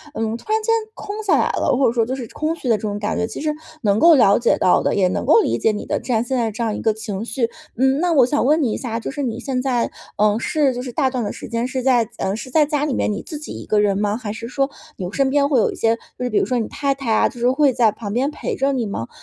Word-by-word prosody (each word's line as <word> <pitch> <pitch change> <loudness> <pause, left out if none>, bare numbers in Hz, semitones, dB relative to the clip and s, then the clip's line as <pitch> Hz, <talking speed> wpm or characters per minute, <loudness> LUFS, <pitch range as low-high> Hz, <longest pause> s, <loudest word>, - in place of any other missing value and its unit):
嗯， 225 0 -1
突 425 - -8
然 440 0 +2
间 455 +1 +1 0.2
空 410 -3 -7
下 400 - +3
来 - - +2
了， 250 - +1
或 270 - +3
者 230 - +1
说 230 -2 +2
就 255 - -3
是 250 -4 -5
空 310 +6 -2
虚 290 -6 -7
的 230 - +4
这 - - -6
种 205 -1 -3
感 210 +1 -2
觉， 220 - 0
其 - - -7
实 300 0 -1 0.3
能 205 -1 +3
够 335 -2 +7
了 200 -6 +5
解 235 - +2
到 180 - +3
的， - - +1
也 190 -2 +3
能 - - -2
够 - - +6
理 - - +1
解 220 - +2
你 210 - -5
的 - - -1
这 250 - -2
样 220 - +2
现 260 +2 -2
在 225 -2 0
这 220 - -6
样 220 -2 0
一 - - -5
个 220 -1 +2
情 210 -1 -5
绪。 230 0 -1 0.3
嗯， 265 +2 +3
那 355 -1 +1
我 270 -6 +5
想 255 0 0
问 305 +3 +3
你 235 -6 +1
一 - - -2
下， 230 -3 -4
就 - - -5
是 285 +1 -4
你 235 -3 -3
现 260 -3 -2
在， 250 -3 0 0.3
呃， 210 +1 +3
是 285 -2 +1
就 245 - -4
是 250 - -6
大 265 +1 +1
段 250 -3 -2
的 205 - -3
时 - - -8
间 230 +1 -2
是 260 0 -2
在 245 -4 +2
呃， 195 +1 -1
是 255 +3 -7
在 300 +3 +4
家 295 -1 -1
里 295 -4 0
面 210 - 0
你 205 - -4
自 305 -3 -7
己 305 - -8
一 - - -8
个 210 - +2
人 200 -2 +2
吗？ 210 +1 0
还 215 -4 -5
是 230 0 -7
说 275 +2 -1 0.3
有 180 0 -5
身 270 +3 +1
边 280 0 +2
会 265 -5 +3
有 - - +2
一 - - -8
些 225 0 +2 0.2
就 250 - -4
是 245 - -1
比 - - 0
如 395 - +1
说 250 - -1
你 225 - -1
太 280 -2 -1
太 250 -5 -1
啊， - - +3
就 240 - -12
是 245 +2 +3
会 280 0 +3
在 230 -3 +3
旁 205 -1 -7
边 270 +5 0
陪 - - -4
着 275 +1 +1
你 245 -4 -1
吗？ 120 - -4
245 Hz, 345 characters per minute, -20 LUFS, 220-275 Hz, 0.3 s, 够